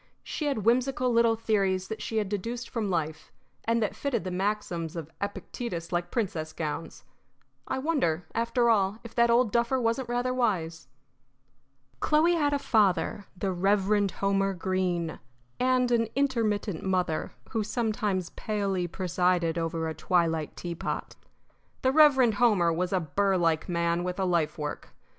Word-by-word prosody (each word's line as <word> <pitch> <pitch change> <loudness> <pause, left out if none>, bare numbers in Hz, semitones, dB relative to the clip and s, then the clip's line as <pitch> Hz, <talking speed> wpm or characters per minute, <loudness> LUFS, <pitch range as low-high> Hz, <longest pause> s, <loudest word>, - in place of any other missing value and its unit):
She 300 - -3
had 225 -8 -1
whimsical 250 +1 +2
little 230 -1 +4
theories 195 -4 0
that 220 - -5
she 225 - -3
had 210 -2 +1
deduced 230 +5 -4
from 220 -4 -2
life, 160 -3 -3 0.3
and 230 0 +2
that 210 - -2
fitted 255 -9 -1
the 185 - -4
maxims 180 -4 -2
of 160 -2 -6
Epictetus 200 -3 -5
like 175 0 -1
princess 175 -9 -2
gowns. 160 +1 -5 0.6
I 265 - -1
wonder, 260 - 0
after 235 +1 +1
all, 200 -1 +2
if 235 - -10
that 235 0 +3
old 235 -1 +4
duffer 235 +3 +2
wasn't 235 +1 0
rather 245 +1 0
wise! 175 -10 -1 1.1
Chloe 315 +3 +3
had 295 -4 +2
a 285 - +2
father, 205 -6 +1
the 190 +1 -1
Reverend 200 +2 +2
Homer 195 0 0
Greene, 180 -2 -1 0.4
and 255 -1 +2
an 230 -1 +3
intermittent 225 -9 0
mother, 180 -4 -1 0.2
who 220 -2 0
sometimes 210 -5 -1
palely 195 -4 -2
presided 180 -2 0
over 165 0 -2
a 160 - -3
twilight 165 -3 0
teapot. 170 -1 -4 0.7
The 260 - +4
Reverend 265 -6 +6
Homer 190 -8 +4
was 180 +2 -1
a 190 - +2
burr 190 +5 +1
like 165 -1 +1
man 170 0 0
with 180 +1 -3
a 190 - +1
life 170 -4 +1
work. 150 -1 -6
200 Hz, 150 wpm, -28 LUFS, 175-235 Hz, 1.1 s, Reverend